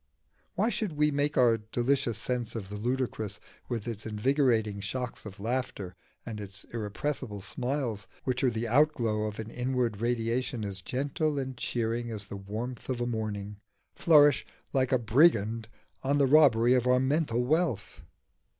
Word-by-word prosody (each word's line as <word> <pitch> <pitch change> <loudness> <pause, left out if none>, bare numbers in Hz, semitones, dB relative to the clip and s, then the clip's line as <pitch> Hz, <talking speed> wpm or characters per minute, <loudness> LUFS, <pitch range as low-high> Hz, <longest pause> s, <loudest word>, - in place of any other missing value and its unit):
Why 215 +5 +2
should 215 -5 -2
we 150 0 +2
make 145 +1 0
our 115 -3 +5
delicious 120 +2 0
sense 120 0 -2
of 100 -4 -5
the 105 - -6
ludicrous, 110 -2 -2 0.3
with 115 -3 -3
its 115 -3 -4
invigorating 110 -2 +1
shocks 120 +3 -4
of 100 -1 -10
laughter 110 -5 -3 0.3
and 110 -3 -5
its 100 0 -6
irrepressible 110 0 -3
smiles 120 -4 -3 0.2
which 130 0 -1
are 130 - +5
the 115 0 -2
outglow 120 -5 +2
of 105 -1 -4
an 110 0 -6
inward 125 -3 -1
radiation 120 0 -1
as 95 -2 -2
gentle 145 - -1
and 130 -1 -3
cheering 120 0 -2
as 105 -3 -6
the - - -5
warmth 110 +6 -6
of 120 -2 -1
morning, 105 -3 -3 0.4
flourish 145 -4 +5 0.3
like 130 -2 +2
a 130 - +5
brigand 115 -3 +3 0.3
on 140 +2 +1
the 140 - +4
robbery 130 -5 +6
of 125 -1 +2
our 125 0 +5
mental 130 -3 +1
wealth? 155 - 0
120 Hz, 155 wpm, -29 LUFS, 110-130 Hz, 0.4 s, robbery